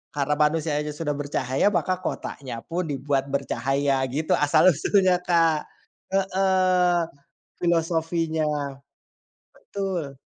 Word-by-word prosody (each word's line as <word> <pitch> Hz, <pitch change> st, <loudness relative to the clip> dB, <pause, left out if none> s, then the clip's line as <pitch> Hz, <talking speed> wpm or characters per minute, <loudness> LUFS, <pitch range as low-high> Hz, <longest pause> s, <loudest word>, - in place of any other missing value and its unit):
karena 145 Hz, +1 st, 0 dB
manusianya 150 Hz, -1 st, +1 dB
sudah 150 Hz, -2 st, -2 dB
bercahaya, 140 Hz, +1 st, 0 dB
maka 185 Hz, -, +1 dB
kotanya 130 Hz, -4 st, -5 dB
pun 175 Hz, +2 st, -1 dB
dibuat 135 Hz, -1 st, -1 dB
bercahaya, 135 Hz, +1 st, 0 dB
gitu 155 Hz, +2 st, -2 dB
asal-usulnya, 180 Hz, +5 st, +4 dB
Kak. 165 Hz, -3 st, +2 dB, 0.5 s
Heeh, 185 Hz, -2 st, +2 dB, 0.6 s
filosofinya. 165 Hz, -1 st, 0 dB, 1.1 s
Betul. 185 Hz, -8 st, -4 dB
160 Hz, 90 wpm, -24 LUFS, 145-180 Hz, 1.1 s, asal-usulnya